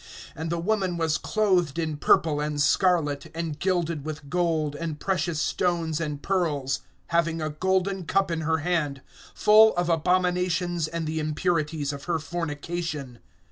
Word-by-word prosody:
(4)And 160 Hz, +2 st, -4 dB
the 170 Hz, -, -1 dB
woman 190 Hz, -1 st, 0 dB
was 160 Hz, -2 st, +1 dB
clothed 185 Hz, -8 st, +1 dB
in 160 Hz, -2 st, -1 dB
purple 150 Hz, +1 st, +3 dB
and 150 Hz, 0 st, -2 dB
scarlet, 160 Hz, -2 st, +2 dB
and 165 Hz, -3 st, -4 dB
gilded 170 Hz, -5 st, 0 dB
with 150 Hz, -2 st, -7 dB
gold, 160 Hz, -4 st, 0 dB
and 155 Hz, -1 st, -4 dB
precious 170 Hz, -4 st, -1 dB
stones 165 Hz, 0 st, 0 dB
and 150 Hz, -3 st, -4 dB
pearls, 145 Hz, -8 st, 0 dB, 0.3 s
having 165 Hz, -1 st, +1 dB
a 155 Hz, -1 st, -2 dB
golden 190 Hz, +3 st, 0 dB
cup 195 Hz, +1 st, +1 dB
in 165 Hz, -1 st, -1 dB
her 160 Hz, +1 st, +1 dB
hand, 150 Hz, -6 st, -1 dB, 0.3 s
full 215 Hz, +1 st, +6 dB
of 175 Hz, 0 st, 0 dB
abominations 180 Hz, 0 st, +1 dB
and 165 Hz, 0 st, -4 dB
the 160 Hz, +1 st, -2 dB
impurities 155 Hz, -2 st, -1 dB
of 140 Hz, 0 st, -8 dB
her 170 Hz, -2 st, 0 dB
fornication. 155 Hz, -3 st, -4 dB
165 Hz, 150 wpm, -26 LUFS, 150-180 Hz, 0.3 s, full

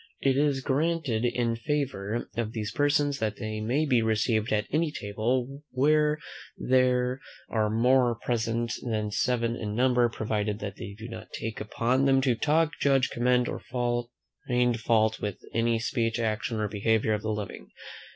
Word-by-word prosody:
It 135 Hz, -1 st, +2 dB
is 140 Hz, -1 st, +2 dB
further -, -, -13 dB
granted 150 Hz, -6 st, 0 dB
in 120 Hz, -1 st, 0 dB
favour 120 Hz, -5 st, -2 dB
of 115 Hz, -1 st, -2 dB
these 110 Hz, -2 st, -3 dB
persons, 145 Hz, +1 st, +1 dB
that 110 Hz, -1 st, -1 dB
they 110 Hz, 0 st, -4 dB
may 130 Hz, +8 st, +1 dB
be 125 Hz, -5 st, +3 dB
received 110 Hz, 0 st, +1 dB
at 105 Hz, -1 st, +1 dB
any 155 Hz, +1 st, +1 dB
table, 125 Hz, +6 st, -2 dB
where 150 Hz, +3 st, +3 dB, 0.4 s
there 125 Hz, 0 st, +2 dB, 0.3 s
are 110 Hz, -2 st, +1 dB
more 120 Hz, +2 st, +3 dB
present 115 Hz, 0 st, -1 dB
than 110 Hz, -3 st, -2 dB
seven 115 Hz, +1 st, 0 dB
in 105 Hz, -3 st, -4 dB
number: 125 Hz, 0 st, +3 dB
provided 105 Hz, -2 st, -2 dB
that 105 Hz, -2 st, -6 dB
they 100 Hz, -, -7 dB
do 110 Hz, +1 st, -8 dB
not 115 Hz, -, -9 dB
take 110 Hz, -1 st, -4 dB
upon 120 Hz, +5 st, +1 dB
them 135 Hz, -1 st, +4 dB
to 130 Hz, -2 st, +3 dB
talk, 150 Hz, +6 st, +2 dB
judge, 135 Hz, -2 st, +3 dB
commend, 125 Hz, 0 st, +2 dB
or -, -, -4 dB
find 120 Hz, 0 st, -2 dB
fault 110 Hz, -1 st, +2 dB
with 105 Hz, -2 st, -3 dB, 0.2 s
any 115 Hz, 0 st, +2 dB
speech, 115 Hz, 0 st, -1 dB
action, 110 Hz, 0 st, -1 dB
or 105 Hz, -, 0 dB
behaviour 110 Hz, +1 st, +1 dB
of 105 Hz, -, -1 dB
the 110 Hz, -, -3 dB
living. 105 Hz, -2 st, -5 dB
120 Hz, 165 wpm, -28 LUFS, 110-130 Hz, 0.4 s, them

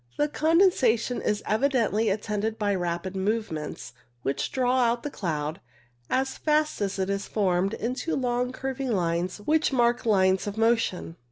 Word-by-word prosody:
The 295 Hz, -, +2 dB
condensation 300 Hz, -, +2 dB
is 210 Hz, 0 st, -1 dB
evi 265 Hz, +7 st, +1 dB
dently 225 Hz, -4 st, +1 dB
attended 210 Hz, +2 st, -2 dB
by 205 Hz, -2 st, 0 dB
rapid 175 Hz, +1 st, -3 dB
movements, 190 Hz, -, -3 dB, 0.3 s
which 135 Hz, -, -2 dB
draw 255 Hz, 0 st, +1 dB
out 235 Hz, -1 st, +1 dB
the 290 Hz, -, -4 dB
cloud, 155 Hz, -, -3 dB, 0.5 s
as 265 Hz, +1 st, -1 dB
fast 305 Hz, -4 st, +1 dB
as 200 Hz, -1 st, -1 dB
it 190 Hz, -1 st, 0 dB
is 200 Hz, 0 st, -2 dB
formed, 195 Hz, -1 st, +1 dB
into 255 Hz, +8 st, -2 dB
long 250 Hz, -1 st, 0 dB
curving 265 Hz, 0 st, -3 dB
lines 175 Hz, -1 st, -1 dB
which 305 Hz, +10 st, +1 dB
mark 240 Hz, -2 st, +2 dB
lines 190 Hz, -2 st, +3 dB
of 205 Hz, +1 st, -4 dB
motion. 225 Hz, -7 st, +1 dB
220 Hz, 155 wpm, -26 LUFS, 190-255 Hz, 0.5 s, lines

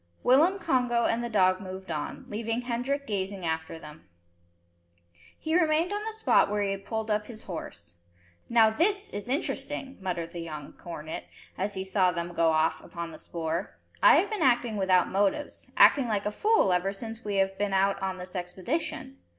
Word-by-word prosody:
Willem, 315 Hz, +10 st, +5 dB
Congo, 250 Hz, -9 st, +1 dB
and 235 Hz, +1 st, +1 dB
the 235 Hz, -, -3 dB
dog 185 Hz, -3 st, +3 dB
moved 190 Hz, -1 st, -7 dB
on, 150 Hz, -2 st, -4 dB
leaving 225 Hz, +2 st, -2 dB
Hendrik 255 Hz, +4 st, -2 dB
gazing 195 Hz, -4 st, -3 dB
after 160 Hz, 0 st, -3 dB
them. 150 Hz, -, -13 dB, 1.3 s
He 315 Hz, +1 st, -2 dB
remained 330 Hz, +2 st, +2 dB
on 415 Hz, +1 st, -2 dB
the 445 Hz, -, -2 dB
spot 440 Hz, -, +3 dB
where 205 Hz, 0 st, 0 dB
he 200 Hz, -, 0 dB
had 195 Hz, 0 st, -6 dB
pulled 220 Hz, -1 st, -2 dB
up 210 Hz, 0 st, 0 dB
his 225 Hz, -2 st, -9 dB
horse. 85 Hz, -, -8 dB, 0.5 s
"Now 225 Hz, -2 st, +5 dB
this 400 Hz, -, +1 dB
is 205 Hz, +3 st, -6 dB
interesting," 275 Hz, -1 st, -2 dB
muttered 175 Hz, -3 st, -3 dB
the 175 Hz, -, -7 dB
young 155 Hz, -3 st, -7 dB
cornet, 160 Hz, -2 st, -7 dB, 0.3 s
as 200 Hz, +2 st, -2 dB
he 190 Hz, -, -2 dB
saw 190 Hz, -1 st, +2 dB
them 170 Hz, 0 st, -4 dB
go 165 Hz, -1 st, +2 dB
off 160 Hz, 0 st, +2 dB
upon 170 Hz, -1 st, -6 dB
the -, -, -10 dB
spoor. 165 Hz, +2 st, -4 dB, 0.2 s
"I -, -, +8 dB
have -, -, +2 dB
been 430 Hz, -, -2 dB
acting 240 Hz, -3 st, +3 dB
without 190 Hz, -3 st, +3 dB
motives, 200 Hz, +9 st, -1 dB
acting 275 Hz, -4 st, +6 dB
like 210 Hz, -3 st, -1 dB
a 210 Hz, -, 0 dB
fool 420 Hz, -, +3 dB
ever 180 Hz, +2 st, +1 dB
since 225 Hz, +3 st, -7 dB
we 205 Hz, -1 st, -3 dB
have 195 Hz, 0 st, +1 dB
been 205 Hz, -1 st, 0 dB
out 195 Hz, +1 st, +2 dB
on 190 Hz, -1 st, -2 dB
this 180 Hz, +1 st, -9 dB
expedition. 180 Hz, -, -4 dB
200 Hz, 185 wpm, -28 LUFS, 180-245 Hz, 1.3 s, I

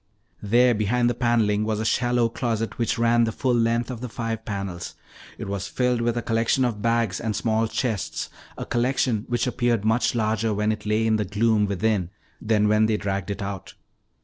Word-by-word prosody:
There 120 Hz, +4 st, +4 dB
behind 120 Hz, +3 st, +1 dB
the -, -, -1 dB
paneling 115 Hz, -4 st, +1 dB
was 110 Hz, -1 st, -1 dB
a 110 Hz, -, -2 dB
shallow 120 Hz, 0 st, +2 dB
closet 115 Hz, -1 st, -3 dB
which 115 Hz, +1 st, 0 dB
ran 120 Hz, 0 st, +3 dB
the 115 Hz, -, -1 dB
full 125 Hz, +3 st, 0 dB
length 115 Hz, +1 st, +1 dB
of 120 Hz, -2 st, -7 dB
the 125 Hz, -, -5 dB
five 115 Hz, -1 st, -4 dB
panels. 100 Hz, -4 st, -5 dB, 0.4 s
It -, -, -6 dB
was 100 Hz, -1 st, -3 dB
filled 125 Hz, -2 st, 0 dB
with 120 Hz, 0 st, 0 dB
a 120 Hz, -, -2 dB
collection 115 Hz, +3 st, +1 dB
of 110 Hz, -4 st, -2 dB
bags 115 Hz, -4 st, +1 dB
and 110 Hz, -2 st, -2 dB
small 110 Hz, 0 st, +1 dB
chests, 110 Hz, -4 st, -2 dB, 0.3 s
a -, -, -5 dB
collection 120 Hz, -2 st, 0 dB
which 120 Hz, -1 st, 0 dB
appeared 120 Hz, -4 st, 0 dB
much 115 Hz, +3 st, +2 dB
larger 110 Hz, -1 st, 0 dB
when 105 Hz, +1 st, +1 dB
it 105 Hz, -1 st, -5 dB
lay 110 Hz, +1 st, +1 dB
in 110 Hz, -1 st, +2 dB
the 105 Hz, -, -1 dB
gloom 105 Hz, +1 st, +2 dB
within 100 Hz, -2 st, 0 dB, 0.3 s
than 105 Hz, -1 st, +2 dB
when 105 Hz, +1 st, +3 dB
they 110 Hz, -1 st, +1 dB
dragged 100 Hz, -1 st, -3 dB
it 100 Hz, +1 st, -3 dB
out. 100 Hz, -2 st, -6 dB
115 Hz, 200 wpm, -24 LUFS, 105-120 Hz, 0.4 s, There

